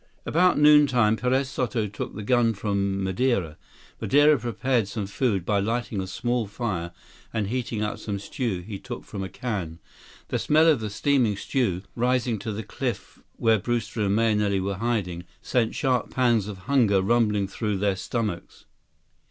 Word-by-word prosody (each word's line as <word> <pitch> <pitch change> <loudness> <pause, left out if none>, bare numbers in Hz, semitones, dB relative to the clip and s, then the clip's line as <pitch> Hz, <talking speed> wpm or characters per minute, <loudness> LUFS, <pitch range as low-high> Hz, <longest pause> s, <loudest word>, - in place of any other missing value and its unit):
About 180 +3 +3
noontime, 145 -7 +5
Perez 130 +3 +1
Soto 125 -4 -1
took 105 0 -6
the 105 - -5
gun 115 0 +2
from 100 -1 -1
Madeira. 95 -5 0 0.5
Madeira 145 +2 +5
prepared 120 -1 0
some 105 0 -4
food 100 -3 -1
by 105 0 +2
lighting 110 0 -1
a 95 - -5
small 120 +3 -1
fire 95 -6 -3 0.4
and 105 -3 -2
heating 120 -3 -2
up 105 - -3
some 100 -2 -4
stew 100 -2 -3
he 100 +1 -7
took 120 +2 -7
from 100 - -6
a 95 - -5
can. 95 -11 -4 0.5
The - - -1
smell 155 +2 +4
of 155 -6 +4
the 110 -1 -4
steaming 115 -1 +1
stew 100 -7 -1
rising 125 -2 +1
to 110 +3 -4
the 105 +2 -4
cliff - - -5 0.2
where 115 -2 +3
Brewster 115 0 -2
and 100 -1 +1
Mahenili 105 -3 +2
were 95 0 -2
hiding, 100 -6 -2 0.2
sent 120 -3 0
sharp 130 -3 0
pangs 120 -5 +2
of 95 -3 -8
hunger 120 -8 +3
rumbling 105 -2 +2
through 105 0 -2
their 100 0 +1
stomachs. 100 -1 -4
110 Hz, 165 wpm, -25 LUFS, 100-125 Hz, 0.5 s, noontime